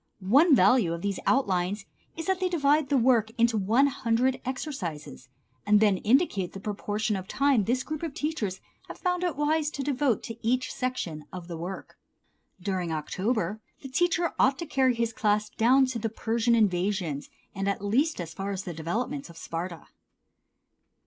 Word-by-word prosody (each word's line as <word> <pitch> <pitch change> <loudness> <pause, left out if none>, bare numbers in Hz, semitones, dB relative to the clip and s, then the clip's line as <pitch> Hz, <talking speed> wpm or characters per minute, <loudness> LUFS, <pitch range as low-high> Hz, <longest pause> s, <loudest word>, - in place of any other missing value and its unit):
One 300 +2 +7
value 200 -3 +4
of 170 - -9
these 200 -1 -1
outlines 200 -5 +1 0.3
is 330 - -4
that 380 +1 0
they 370 -1 0
divide 295 -4 +2
the 280 - +3
work 235 -3 +3
into 235 -1 +3
one 220 +7 +3
hundred 260 -1 0
exercises, 185 - -5 0.3
and 210 0 +4
then 205 -3 +4
indicate 215 - +2
the 195 - -7
proportion 210 +1 -2
of 190 -1 -5
time 275 -7 +2
this 245 +3 0
group 310 -1 -5
of 325 -4 -4
teachers 235 - -3 0.3
have - - -9
found 360 -1 -1
it 350 -5 0
wise 300 +1 +1
to 280 -2 -5
devote 270 -4 0
to 230 - -7
each 255 +3 0
section 175 -12 -3
of 180 -2 -8
the 170 - -6
work. 180 +4 -7 0.6
During 180 -2 -2
October 190 +6 -2 0.2
the 270 - -7
teacher 345 +4 +1
ought 265 +2 +4
to 340 - -5
carry 265 -4 +2
his 230 0 -1
class 210 -3 +1
down 250 +4 +4
nearly 260 - +3
to 235 - -3
the 225 0 -2
Persian 230 +2 +1
invasions, 180 -7 0 0.2
and 195 +1 -1
at 200 0 -2
least 275 +9 +1
as 165 -2 -5
far 195 +4 -4
as 195 -1 -3
the 175 - -5
development 225 - -3
of 170 - -13
Sparta. 170 +1 -5
225 Hz, 180 wpm, -27 LUFS, 190-270 Hz, 0.6 s, One